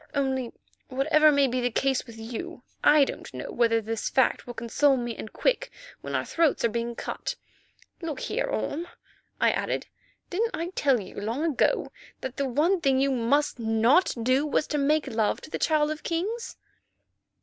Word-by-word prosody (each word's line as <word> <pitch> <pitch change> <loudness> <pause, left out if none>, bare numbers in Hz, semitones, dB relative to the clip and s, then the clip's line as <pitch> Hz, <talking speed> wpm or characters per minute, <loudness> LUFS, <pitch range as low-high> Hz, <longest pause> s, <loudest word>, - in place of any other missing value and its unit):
Only, 265 -3 0 0.4
whatever 305 +4 +4
may 280 -1 +4
be 255 -1 -1
the 245 - +1
case 265 +2 0
with 230 -1 -11
you, 240 +10 -7 0.2
I 295 -1 +7
don't - - -7
know - - -6
whether 230 -1 +3
this 225 0 -3
fact 260 -1 +2
will 240 - -7
console 270 +4 +2
me 240 -2 -3
and 215 - -8
Quick - - 0 0.3
when - - -4
our - - 0
throats 325 -7 +2
are - - +3
being 235 +1 -3
cut. - - -4 0.7
Look 315 -5 -4
here, - - -1
Orme," 335 +4 -2 0.5
I - - +4
added, - - -2 0.5
"didn't 450 +6 0
I 335 +2 -3
tell 275 -8 +2
you 195 0 -8
long 230 +8 -2
ago 315 -6 +1 0.3
that 260 -1 -5
the 275 -1 0
one 335 +8 +2
thing 270 -3 +3
you 275 +1 +2
must 265 +3 +1
not 225 +9 +3
do 255 +4 +3
was 300 0 +1
to 295 - 0
make 300 +2 +2
love 225 -5 0
to - - -12
the - - -3
Child 305 -1 +2
of 310 - -5
Kings?" 410 +8 -3
275 Hz, 180 wpm, -27 LUFS, 235-310 Hz, 0.7 s, I